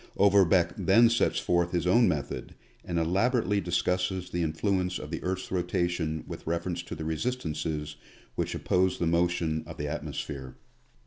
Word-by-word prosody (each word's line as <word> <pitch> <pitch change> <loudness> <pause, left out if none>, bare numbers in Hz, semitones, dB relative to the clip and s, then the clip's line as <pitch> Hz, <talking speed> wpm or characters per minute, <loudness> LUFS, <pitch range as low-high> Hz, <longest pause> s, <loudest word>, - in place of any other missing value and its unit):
Overbeck 95 -3 +4
then 105 +5 +5
sets 115 - +2
forth 85 0 +1
his 85 -1 0
own 115 +6 +5
method, 75 -5 -3 0.3
and 85 - -3
elaborately 100 +4 +2
discusses 90 +1 -1
the 85 - -1
influence 90 +3 0
of - - -8
the - - -3
earth's 95 +1 -3
rotation 85 -3 -1
with - - -9
reference 85 +1 -2
to 90 - -7
the 80 - -6
resistances 80 -5 -3 0.4
which - - -2
oppose 90 0 +1
the 85 - -1
motion 85 -1 +1
of - - -9
the 75 - -3
at - - -3
mosphere. 65 -3 -6
90 Hz, 155 wpm, -28 LUFS, 80-95 Hz, 0.4 s, then